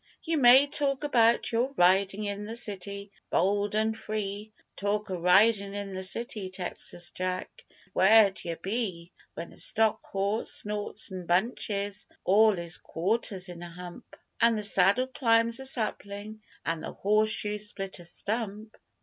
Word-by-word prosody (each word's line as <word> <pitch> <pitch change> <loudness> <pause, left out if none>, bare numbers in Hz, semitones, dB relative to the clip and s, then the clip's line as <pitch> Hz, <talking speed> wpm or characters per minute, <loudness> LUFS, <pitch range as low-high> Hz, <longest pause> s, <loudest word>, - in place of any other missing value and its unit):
You 325 -3 0
may 260 +2 +7
talk 280 -1 -1
about 235 -5 +3
your 250 +4 -1
ridin' 195 +3 +3
in 205 0 -4
the 225 - -6
city, 200 -2 -4 0.2
bold 205 +3 +1
an' 220 +1 +1
free, 215 -1 -5 0.2
Talk 205 0 -2
o' 180 - -3
ridin' 200 +3 +4
in 200 -1 -5
the 185 - -4
city, 210 0 -3
Texas 180 -1 -6
Jack, 185 0 -5
but 185 - -28
where'd 200 0 +5
yer 170 -1 -4
be 185 -2 -4 0.2
When 165 +1 -7
the - - -15
stock 220 0 +1
horse 200 +3 -2
snorts 210 0 0
an' 185 -2 -7
bunches 200 +1 -1 0.2
all 210 +1 +4
'is 170 -2 -1
quarters 190 +1 -1
in 175 -1 -9
a 175 - -8
hump, 180 +6 -11 0.3
And 230 -1 +4
the 210 - -3
saddle 200 +5 +4
climbs 230 -3 +2
a 265 - -3
sapling, 215 -3 -2 0.2
an' 165 -1 -2
the - - -7
horse 215 +2 +2
shoes 210 -1 +2
split 195 -2 -5
a - - -11
stump? 215 +3 -4
205 Hz, 160 wpm, -28 LUFS, 190-220 Hz, 0.3 s, may